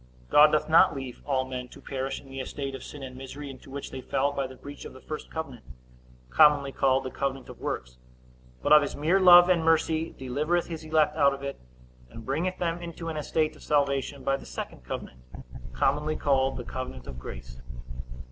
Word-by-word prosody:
God 150 +1 +9
doth 155 - +1
not 160 -1 +6
leave 135 -3 -7
all 130 -2 +1
men 130 -1 -5
to - - -14
perish 135 0 -4
in 140 - -16
the 135 0 -7
estate 135 +1 -4
of 135 - -7
sin 145 -2 -9
and 130 -1 -8
misery, 135 +2 -7
into 130 0 -14
which 140 +1 -6
they 130 - -6
fell 140 +3 0
by 140 -2 -2
the 130 - -11
breach 145 +2 -10
of - - -9
the 130 - -12
first 155 +3 -7
covenant, 140 -7 -6 0.7
commonly 140 - +5
called 135 0 +2
the 130 - -5
covenant 135 -1 -3
of - - -11
works; 60 0 -5 0.6
but 150 - +5
of 150 - +9
his 145 - -3
mere 165 +7 +2
love 175 -1 +9
and 175 -3 +3
mercy 160 0 +1
delivereth 150 +7 0
his 165 -2 -7
elect 155 -1 +2
out 140 -3 +4
of 140 - -11
it, 140 0 -5 0.5
and 115 - -11
bringeth 165 +8 -1
them 170 0 -2
into 170 -1 -6
an 160 - -4
estate 155 +1 0
of - - -17
salvation 140 -1 0
by 135 - +2
the 135 - -8
second 60 - -7
covenant, 65 0 -7 0.5
commonly 150 - +1
called 135 -2 +1
the 125 - -5
covenant 125 - -6
of 60 - -8
grace. 65 0 -9
140 Hz, 205 wpm, -27 LUFS, 130-155 Hz, 0.7 s, God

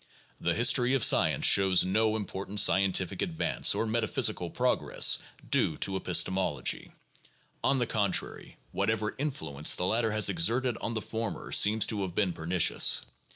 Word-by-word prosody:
The - - -1
history 125 +2 +2
of 130 - +1
science - - +3
shows 95 -2 +4
no 110 +3 0
important 100 -1 -5
scientific 95 -2 +1
advance 170 -4 0
or - - -1
metaphysical 110 0 -1
progress - - +1 0.3
due 80 - 0
to 95 - -2
epistemology. 95 0 -1 0.7
On 135 0 +2
the 120 - 0
contrary, 105 -4 -2
whatever 105 +1 -2
influence 80 - -1
the 90 - -2
latter 115 +4 0
has 110 0 +3
exerted 115 +7 0
on 115 - -5
the 110 - -3
former 115 -1 -6
seems 105 +2 +4
to 105 -3 -4
have 90 -3 -5
been 95 -4 0
pernicious. 85 +1 +2
105 Hz, 145 wpm, -28 LUFS, 95-115 Hz, 0.7 s, shows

